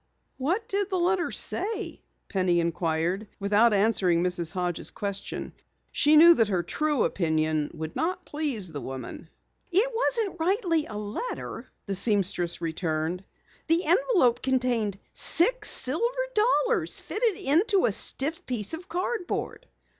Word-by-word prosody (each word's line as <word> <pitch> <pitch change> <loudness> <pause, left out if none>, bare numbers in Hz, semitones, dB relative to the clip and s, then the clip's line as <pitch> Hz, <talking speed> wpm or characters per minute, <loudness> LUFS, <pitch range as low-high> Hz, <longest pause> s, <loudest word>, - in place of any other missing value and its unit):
"What 360 - -1
did 400 -2 -1
the 380 - -1
letter 355 0 +1
say?" 425 +3 -3 0.3
Penny 185 -3 +1
inquired, 170 +3 -1
without 205 +4 +3
answering 195 -5 +2
Mrs. 175 -3 0
Hodges' 180 -1 -2
question. 200 -1 -5 0.4
She 300 +1 +3
knew 335 +3 +9
that 225 -9 +2
her 185 -4 0
true 300 - 0
opinion 155 -3 0
would 160 +1 -6
not 355 +3 -2
please 270 - -1
the 145 -3 -6
woman. 130 -1 -8 0.4
"It 420 +8 +3
wasn't 450 -6 0
rightly 340 -3 +1
a 210 - -7
letter," 210 - -6 0.2
the 200 - -3
seamstress 195 -4 +2
returned. 165 +1 -2 0.4
"The 330 +3 +3
envelope 345 - +3
contained 245 -6 0 0.2
six - - +3
silver 470 - 0
dollars 475 +2 +1
fitted 435 -3 -1
into 365 +8 +2
a - - +2
stiff 285 +10 0
piece 235 0 -2
of 350 +3 -7
cardboard." 370 +6 -3
250 Hz, 130 wpm, -26 LUFS, -, 0.4 s, knew